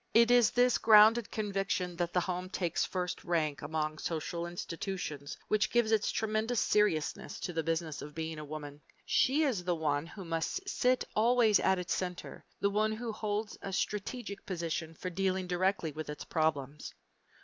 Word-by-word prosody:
It 235 Hz, +1 st, +6 dB
is 245 Hz, -2 st, +6 dB
this 245 Hz, 0 st, +3 dB
grounded 220 Hz, +1 st, +7 dB
conviction 195 Hz, -4 st, -2 dB
that 175 Hz, -1 st, -1 dB
the 180 Hz, -, +2 dB
home 180 Hz, +1 st, -3 dB
takes 175 Hz, -3 st, -1 dB
first 180 Hz, -1 st, -3 dB
rank 155 Hz, -4 st, 0 dB
among 155 Hz, 0 st, -2 dB
social 170 Hz, +1 st, -3 dB
institutions 170 Hz, -4 st, -5 dB
which 215 Hz, -1 st, +2 dB
gives 240 Hz, -2 st, +2 dB
its 215 Hz, -1 st, +2 dB
tremendous 220 Hz, +2 st, 0 dB
seriousness 195 Hz, -8 st, +1 dB
to 180 Hz, -, -3 dB
the 165 Hz, -, 0 dB
Business 160 Hz, -1 st, -2 dB
of 150 Hz, 0 st, -9 dB
Being 160 Hz, -1 st, -4 dB
a -, -, -6 dB
Woman. 145 Hz, -1 st, -8 dB, 0.2 s
She 285 Hz, +5 st, +3 dB
is 240 Hz, -11 st, 0 dB
the 175 Hz, -1 st, 0 dB
one 150 Hz, -1 st, -1 dB
who 190 Hz, +2 st, -9 dB
must 165 Hz, -, -2 dB
sit 255 Hz, -8 st, +2 dB
always 225 Hz, -1 st, +4 dB
at 190 Hz, -, +3 dB
its 180 Hz, -1 st, -2 dB
center, 180 Hz, -1 st, -5 dB, 0.2 s
the 200 Hz, -, +1 dB
one 215 Hz, +1 st, +1 dB
who 230 Hz, +1 st, -4 dB
holds 210 Hz, 0 st, -3 dB
a 195 Hz, -, -5 dB
strategic 205 Hz, +2 st, -3 dB
position 165 Hz, -3 st, -3 dB
for 185 Hz, +3 st, -5 dB
dealing 190 Hz, +1 st, 0 dB
directly 180 Hz, -2 st, 0 dB
with 155 Hz, +1 st, -6 dB
its 150 Hz, -, -6 dB
problems. 150 Hz, -3 st, -1 dB
180 Hz, 170 wpm, -32 LUFS, 160-215 Hz, 0.2 s, grounded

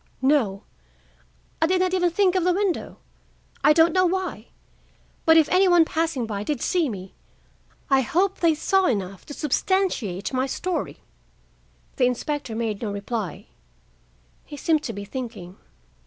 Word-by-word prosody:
"No,—I 320 Hz, -, +3 dB
did 370 Hz, +1 st, +2 dB
not 370 Hz, 0 st, +1 dB
even 355 Hz, -1 st, +2 dB
think 365 Hz, +1 st, +2 dB
of 370 Hz, -2 st, +1 dB
the 360 Hz, 0 st, +3 dB
window,—I 390 Hz, -5 st, -3 dB
don't 325 Hz, +1 st, +4 dB
know 370 Hz, -1 st, +4 dB
why; 360 Hz, -, -3 dB, 0.8 s
but, 320 Hz, 0 st, +7 dB
if 315 Hz, -2 st, +5 dB
any 375 Hz, +1 st, +4 dB
one 350 Hz, -2 st, +5 dB
passing 320 Hz, -7 st, -1 dB
by 205 Hz, -2 st, -4 dB
did 265 Hz, +5 st, -2 dB
see 335 Hz, +2 st, +1 dB
me, 190 Hz, -3 st, -8 dB, 0.7 s
I 270 Hz, -1 st, +4 dB
hope 370 Hz, +9 st, 0 dB
they 330 Hz, -2 st, +3 dB
saw 385 Hz, +4 st, +2 dB
enough 195 Hz, -5 st, -3 dB
to 290 Hz, -, -7 dB
substantiate 295 Hz, -, -1 dB
my 260 Hz, +1 st, 0 dB
story." 360 Hz, +6 st, -3 dB, 1.0 s
The 255 Hz, -, +3 dB
inspector 250 Hz, -1 st, -3 dB
made 220 Hz, -3 st, -2 dB
no 215 Hz, -3 st, -3 dB
reply. 200 Hz, -1 st, -4 dB, 1.0 s
He 295 Hz, -, -10 dB
seemed 310 Hz, +1 st, +1 dB
to 230 Hz, -, -4 dB
be 200 Hz, 0 st, -7 dB
thinking. 210 Hz, -6 st, -7 dB
300 Hz, 145 wpm, -24 LUFS, 225-360 Hz, 1.0 s, but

